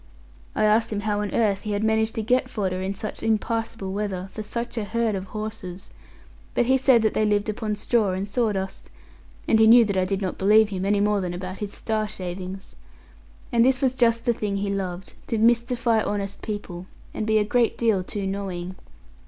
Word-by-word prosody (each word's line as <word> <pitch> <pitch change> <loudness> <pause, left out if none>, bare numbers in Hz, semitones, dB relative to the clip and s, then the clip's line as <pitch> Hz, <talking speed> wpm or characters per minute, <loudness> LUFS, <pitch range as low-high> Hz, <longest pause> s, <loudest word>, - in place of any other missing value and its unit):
I 215 - +2
asked 215 +2 +3
him 205 -1 -2
how 205 0 -1
on 205 - -3
earth 205 -4 +1
he 210 - -3
had 205 +1 -1
managed 220 0 +1
to 225 - -2
get 250 +4 +1
fodder, 185 -3 -2
in 190 +1 -3
such 210 +2 -6
impassable 225 -2 -1
weather, 195 -2 -3
for 215 - -6
such 235 +3 -5
a 225 - -1
herd 225 +1 0
of 190 -1 -3
horses; 205 -3 -6 0.6
but 240 - +3
he 260 +2 +4
said 260 -3 +4
that 220 - +2
they 215 - +1
lived 210 0 +1
upon 215 -1 -2
straw 210 -2 +1
and 190 +2 -3
sawdust; 205 -3 -2 0.6
and 220 - +4
he 220 - +6
knew 235 +1 +8
that 200 -2 -1
I 185 - +2
did 195 +1 -1
not 190 -3 -3
believe 210 +2 +5
him, 190 -2 -3
any 200 0 +2
more 205 -1 +2
than 175 -1 -3
about 185 +1 -6
his 205 -1 -5
star 215 -1 -1
shavings. 185 -1 -7 0.8
And 235 -1 +4
this 255 0 +3
was 260 -2 +2
just 230 -2 +2
the 240 - +3
thing 205 -3 -2
he 200 0 -1
loved 185 -1 -4
to 225 - -1
mystify 235 0 +2
honest 200 -1 -3
people, 190 -4 -6 0.3
and 215 - -3
be 220 0 +3
a 210 - +3
great 235 +2 +1
deal 220 -5 +2
too 200 +2 -4
knowing. 190 -2 -4
210 Hz, 210 wpm, -24 LUFS, 195-225 Hz, 0.8 s, knew